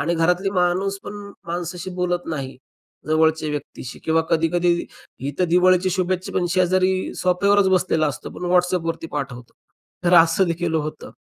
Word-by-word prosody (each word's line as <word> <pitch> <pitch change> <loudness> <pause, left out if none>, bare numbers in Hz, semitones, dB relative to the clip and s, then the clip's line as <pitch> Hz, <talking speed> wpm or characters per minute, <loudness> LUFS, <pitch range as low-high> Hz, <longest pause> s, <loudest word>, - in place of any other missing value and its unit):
आणि 170 +5 0
घरातली 180 +4 +1
माणूस 190 +1 0
पण 210 - -7 0.3
माणसाशी 175 +2 -4
बोलत 180 -1 -1
नाही 140 -5 -5 0.5
जवळच्या 155 0 +2
व्यक्तीशी 145 -4 -6
किंवा 160 0 +2
कधी-कधी 170 +1 +2 0.4
इथं 145 +6 -1
दिवाळीच्या 185 +1 +4
शुभेच्छा 185 0 -1
पण 175 - +1
शेजारी 185 +1 +1
सोफ्यावरच 195 +2 +3
बसलेला 180 -4 +2
असतो, 140 - -5
पण 180 - -8
WhatsAppवरती 180 -2 +1
पाठवतो. 125 -4 -5 0.5
तर 175 +1 +4
असंदेखील 170 0 +3
होतं. 155 -1 -3
175 Hz, 135 wpm, -22 LUFS, 160-185 Hz, 0.5 s, दिवाळीच्या